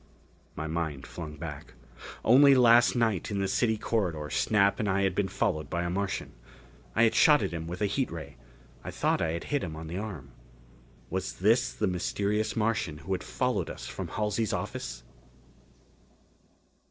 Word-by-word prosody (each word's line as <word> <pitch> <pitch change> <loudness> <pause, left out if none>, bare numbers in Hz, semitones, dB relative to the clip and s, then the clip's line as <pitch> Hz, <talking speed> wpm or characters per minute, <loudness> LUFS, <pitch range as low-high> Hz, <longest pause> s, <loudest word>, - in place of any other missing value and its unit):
My 80 - -4
mind 80 -4 -3
flung 80 -3 -7
back. 75 -4 -8 0.5
Only 140 +3 +7
last 120 -1 +6
night 110 -6 +1
in 100 - -2
the 100 - 0
city 110 +3 +1
corridor, 85 -10 -2
Snap 100 -2 +2
and 105 - 0
I 100 +1 +2
had 95 -1 +1
been 95 +1 0
followed 85 -10 -1
by 85 +3 -1
a 85 - -2
Martian. 100 +1 -2 0.6
I 115 - +4
had 115 - +4
shot 150 -2 +5
at - - -2
him 80 -1 -5
with 90 +4 -4
a - - +4
heat 125 +6 0
ray: 80 -4 -8 0.5
I - - -6
thought - - 0
I 80 -1 0
had 85 - -4
hit 145 -2 -1
him 80 -4 -5
on 80 +1 -7
the 85 +4 -4
arm. 95 -11 -7 0.8
Was 95 +1 -2
this 110 +6 +2
the 105 - -1
mysterious 100 +3 -1
Martian 105 -8 0
who 95 - -8
had 95 - -1
followed - - -1
us - - -7
from - - -5
Halsey's 105 0 -1
office? - - -4
95 Hz, 175 wpm, -29 LUFS, 80-110 Hz, 0.8 s, Only